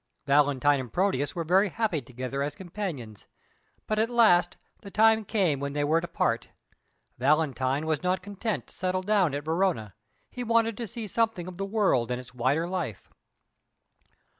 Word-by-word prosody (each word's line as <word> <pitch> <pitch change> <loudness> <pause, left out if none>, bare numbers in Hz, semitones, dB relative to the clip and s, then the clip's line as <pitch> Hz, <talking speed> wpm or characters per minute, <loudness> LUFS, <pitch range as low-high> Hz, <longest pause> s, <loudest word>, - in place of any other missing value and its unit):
Valentine 145 0 +3
and 125 -4 -6
Proteus 145 - 0
were 170 - -2
very 190 +5 +3
happy 205 -6 -1
together 130 +2 -5
as 145 +1 -2
companions, 175 - -6 0.6
but 215 0 -1
at 225 +1 +2
last 180 -8 +4 0.2
the 200 - -10
time 220 +2 +4
came 190 - +1
when 140 0 -3
they 145 0 0
were 160 +3 +2
to 175 - -5
part. 115 -9 -1 0.7
Valentine 140 0 +1
was 155 -2 0
not 185 +1 0
content 205 +2 -3
to - - -19
settle 185 0 -1
down 190 -7 +2
at 145 +1 -5
Verona; 160 - 0 0.4
he 250 - -5
wanted 230 -1 +2
to 235 - -4
see 225 +3 -6
something 220 -3 0
of 180 -1 -8
the 195 0 -3
world 195 - +2
and 125 0 -2
its 125 0 -12
wider 135 +7 +1
life. 175 - -4
175 Hz, 170 wpm, -27 LUFS, 140-205 Hz, 0.7 s, last